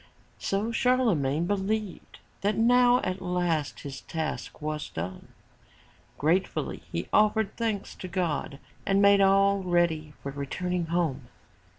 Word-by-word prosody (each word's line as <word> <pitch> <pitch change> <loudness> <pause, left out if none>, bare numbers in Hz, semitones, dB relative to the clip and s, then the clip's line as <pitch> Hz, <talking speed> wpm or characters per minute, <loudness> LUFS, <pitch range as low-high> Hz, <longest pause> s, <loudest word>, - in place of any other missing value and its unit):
So 205 +4 -1
Charlemagne 200 - +2
believed 205 +1 -2 0.2
that 205 +1 +1
now 245 +2 +5
at 185 0 -3
last 175 -5 -1
his 140 -2 -7
task 160 -1 -4
was 155 0 -4
done. 90 +3 -6 0.9
Gratefully 170 +6 0
he - - -3
offered 215 -1 +3
thanks 220 -4 -2
to 185 - -6
God 175 -5 -2 0.3
and 195 0 +2
made 200 0 +6
all 195 +1 +4
ready 170 -4 +1
for 140 - -4
returning 170 +5 -3
home. 160 -7 -1
185 Hz, 120 wpm, -27 LUFS, 155-205 Hz, 0.9 s, made